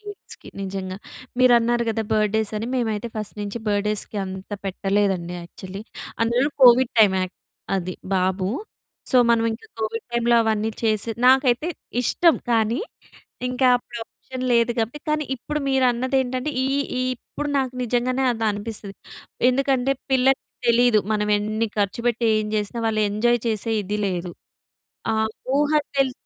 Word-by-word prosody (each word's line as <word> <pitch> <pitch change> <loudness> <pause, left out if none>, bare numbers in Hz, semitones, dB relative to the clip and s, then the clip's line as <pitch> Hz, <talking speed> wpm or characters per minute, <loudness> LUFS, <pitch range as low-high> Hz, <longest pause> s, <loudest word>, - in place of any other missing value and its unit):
కిడ్స్‌కి 410 -1 -11
నిజంగా. 190 -1 -4 0.4
మీరు 255 -1 +6
అన్నారు 235 +1 +1
గద, 225 0 0
బర్డ్ 215 -1 +2
డే‌స్ 220 -1 -1
అని 225 - -4
మేమైతే 225 -2 -1
ఫస్ట్ 215 -1 -3
నుంచి 205 +3 -4
బర్డేస్‌కి 210 +1 -1
అంత 190 +1 -8
పెట్టలేదండి 195 -2 0
యాక్చువలీ. 190 +3 -9 0.4
అందులో 240 +5 +2
కోవిడ్ 250 0 +7
టైమ్ 205 -3 +6
యాక్ 185 0 -3 0.4
అది 185 -1 -3 0.2
బాబు. 185 0 +1 0.6
సో 260 - +4
మనం 230 -1 +3
ఇంకా 225 - -9
కోవిడ్ 220 +1 -3
టైమ్‌లో 235 0 +3
అవన్నీ 220 0 0
చేసి 220 0 +1 0.2
నాకైతే 260 +3 +4 0.3
ఇష్టం 335 +6 +4 0.2
కానీ, 225 +1 +2 0.7
ఇంకా 255 +1 +1
అప్పుడు 240 -1 -9
ఆప్షన్ 255 +2 -8
లేదు 235 0 +3
కాబట్టి. 235 +7 -2
కానీ, 305 0 +1
ఇప్పుడు 300 +5 -4
మీరు 265 -1 +3
అన్నదేంటంటే 260 +2 -1
ఈ - - +1 0.3
ఈ - - +1
ఇప్పుడు 295 +4 -6
నాకు 260 -1 -1
నిజంగానే 250 +2 0
అది 225 -1 -3
అనిపిస్తది. 205 -1 -5 0.6
ఎందుకంటే 270 0 +1 0.2
పిల్లలకి 265 +1 +3 0.2
తెలీదు. 235 -1 +5
మనం 210 0 0
ఎన్ని 215 +2 -1
ఖర్చుపెట్టి 235 +4 0
ఏం 215 - 0
జేసినా 215 +2 -2
వాళ్ళు 215 -1 +1
ఎంజాయ్ 240 +4 +2
చేసే 220 +1 -2
ఇది 205 +2 -3
లేదు. 180 -2 -3 0.8
ఆ - - +1 0.4
ఊహ 295 +1 +2 0.2
తెల్ 270 -2 +2
230 Hz, 145 wpm, -23 LUFS, 205-250 Hz, 0.8 s, కోవిడ్